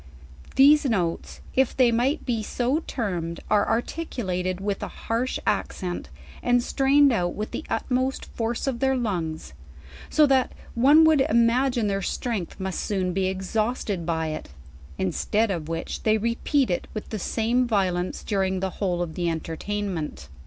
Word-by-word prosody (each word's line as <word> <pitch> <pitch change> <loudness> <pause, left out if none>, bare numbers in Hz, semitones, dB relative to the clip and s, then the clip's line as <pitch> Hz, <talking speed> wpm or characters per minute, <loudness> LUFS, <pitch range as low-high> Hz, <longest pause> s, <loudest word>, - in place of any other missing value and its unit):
These 295 +2 +6
notes, 180 -9 -1
if 265 -1 +1
they 250 -2 +5
might 255 +7 +1
be 235 -4 0
so 245 +6 0
termed, 175 -9 -3
are 205 - +3
articulated 190 - -2
with 200 0 -2
a - - -3
harsh 235 +3 -2
accent, 175 - -2 0.3
and 245 0 +3
strained 275 +1 +4
out 175 -5 0
with 210 +1 -4
the - - -4
ut - - -1
most 260 +1 0
force 230 0 -3
of 265 -4 -1
their 265 +1 +2
lungs; 170 - -3 0.6
so 305 - +5
that 265 -2 +2 0.2
one 285 +7 +6
would 315 -3 +5
imagine 235 0 +3
their 195 -1 0
strength 205 -3 -3
must 190 -1 -3
soon 185 -3 -1
be 190 0 +1
exhausted 200 0 -1
by 160 -1 -1
it; 155 - -6 0.5
instead 205 - 0
of 165 -4 -4
which, 165 0 -4
they 215 0 +3
repeat 235 +3 +1
it 175 - -2
with 215 - -5
the 215 - -4
samp 235 +5 0
violence 185 -4 0
during 190 -2 0
the 190 0 -2
whole 180 -3 0
oi - - +1
the 170 +1 -2
entertainment. 165 - -4
215 Hz, 160 wpm, -25 LUFS, 180-250 Hz, 0.6 s, These